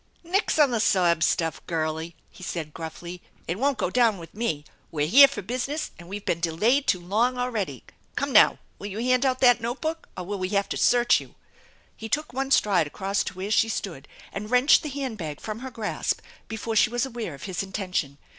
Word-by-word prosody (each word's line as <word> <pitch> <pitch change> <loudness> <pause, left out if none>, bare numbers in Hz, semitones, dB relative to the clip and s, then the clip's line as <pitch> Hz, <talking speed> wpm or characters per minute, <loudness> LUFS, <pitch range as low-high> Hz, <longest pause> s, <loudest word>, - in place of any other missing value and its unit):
" - - -37
Nix 370 +3 0
on 295 -4 +5
the 235 - 0
sob 175 -6 +3
stuff, 165 -2 0
girlie! 160 0 -2
" - - -37
he - - -16
said 165 -4 -5
gruffly. 170 +2 -7
" - - -32
It 175 +5 -3
won't 275 0 +1
go 180 - -1
down 230 -3 +3
with 165 -2 -11
me! 165 -10 -2 0.2
We're 150 -2 -1
here 275 - +8
for 275 -7 -6
business 255 +8 -3
and 175 0 -12
we've 200 +1 -6
been 170 - 0
delayed 210 - +1
too 180 - +2
long 220 +8 0
already. 215 - -3 0.3
Come - - -2
now, - - +7 0.2
will 200 - -6
you 205 0 -6
hand 255 +3 +2
out 255 -1 -1
that 245 -2 +5
note 240 +3 -3
book 320 +1 -4
or 180 - -4
will 200 +2 -4
we 185 0 -2
have 200 0 +1
to - - -2
search 245 0 +4
you?" - - -14 0.6
He 225 - -8
took 300 +2 -1
one 270 +1 -2
stride 195 - +3
across 195 +6 -1
to 185 - -5
where 190 +3 -5
she 225 +1 +3
stood 170 -10 -5 0.3
and 210 +2 -5
wrenched 250 +4 +5
the 305 - -5
hand 265 -6 -4
bag 155 -4 -5
from 215 0 -6
her 260 +2 -6
grasp 225 -4 -2 0.3
before 220 0 -4
she 215 - +5
was 240 +3 0
aware 230 - -5
of 135 - -13
his 185 -3 -3
intention. 185 -7 -3
210 Hz, 225 wpm, -25 LUFS, 175-250 Hz, 0.6 s, here